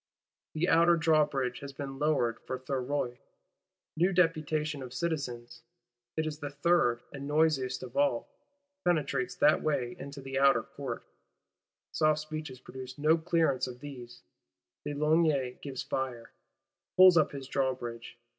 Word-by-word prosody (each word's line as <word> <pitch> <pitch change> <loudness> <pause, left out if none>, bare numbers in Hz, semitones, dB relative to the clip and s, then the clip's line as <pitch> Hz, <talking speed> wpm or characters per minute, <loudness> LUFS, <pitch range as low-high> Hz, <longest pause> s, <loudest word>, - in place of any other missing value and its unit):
The 165 +3 +1
Outer 170 +1 +5
Drawbridge 150 -6 +2
has 140 -1 -8
been 135 -1 -6
lowered 140 -7 +1
for 130 - -2
Thuriot; 130 -1 -2 0.8
new 175 +4 +3
deputation 155 -4 +1
of 125 -1 -8
citizens 125 -8 -3 0.6
(it 160 - +1
is 155 -1 -4
the 145 - -4
third, 140 -4 +2
and 140 0 -6
noisiest 150 -3 +1
of - - -9
all) 285 0 +1 0.6
penetrates 140 -7 0
that 150 +1 +4
way 130 -6 -1
into 140 +1 -8
the 135 0 -3
Outer 140 0 +5
Court: - - -6 0.9
soft 155 0 +2
speeches 155 -4 -6
producing 130 +2 -9
no 155 +1 +6
clearance 165 -6 +1
of 125 -1 -8
these, 125 -4 -10 0.6
de 145 - -3
Launay 150 -4 +2
gives 135 -3 -5
fire; 125 -3 -4 0.7
pulls 185 -1 +9
up 155 -3 +4
his 135 -2 -7
Drawbridge. 120 -4 -3
140 Hz, 135 wpm, -30 LUFS, 130-155 Hz, 0.9 s, pulls